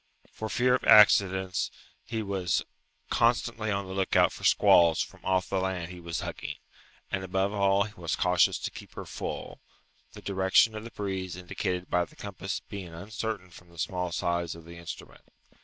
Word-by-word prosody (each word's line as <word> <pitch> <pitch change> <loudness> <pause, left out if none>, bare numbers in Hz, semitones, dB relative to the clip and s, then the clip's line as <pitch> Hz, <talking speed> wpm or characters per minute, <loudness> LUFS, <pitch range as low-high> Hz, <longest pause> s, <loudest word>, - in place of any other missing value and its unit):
For 110 - -5
fear 125 +2 +3
of 130 - +1
accidents, 95 -3 +5 0.3
he 115 -1 -3
was 95 -3 0 0.5
constantly 115 -2 +1
on 100 -1 -1
the 95 - -7
lookout 95 0 +3
for - - -11
squalls 85 -2 +5
from - - -14
off 95 -1 +1
the 95 - 0
land 95 -2 -2
he 90 - -9
was 85 -1 -4
hugging, - - -5 0.6
and 95 - -1
above 95 +2 0
all 100 -1 +3
he 105 +1 -8
was 85 -6 -3
cautious 90 0 +3
to - - -4
keep - - -11
her - - -6
full; - - -6 0.5
the - - -10
direction 95 +3 +3
of 110 0 -6
the 115 - -8
breeze 95 -4 -4
indicated 90 0 -3
by 90 -1 +1
the - - -20
compass 100 -1 -5
being 90 -5 -7
uncertain 100 0 -5
from 85 +1 -15
the 85 - -18
small 90 +1 -2
size 85 0 -1
of 85 -1 -13
the 85 0 -11
instrument. 85 -1 -9
95 Hz, 180 wpm, -28 LUFS, 90-100 Hz, 0.6 s, accidents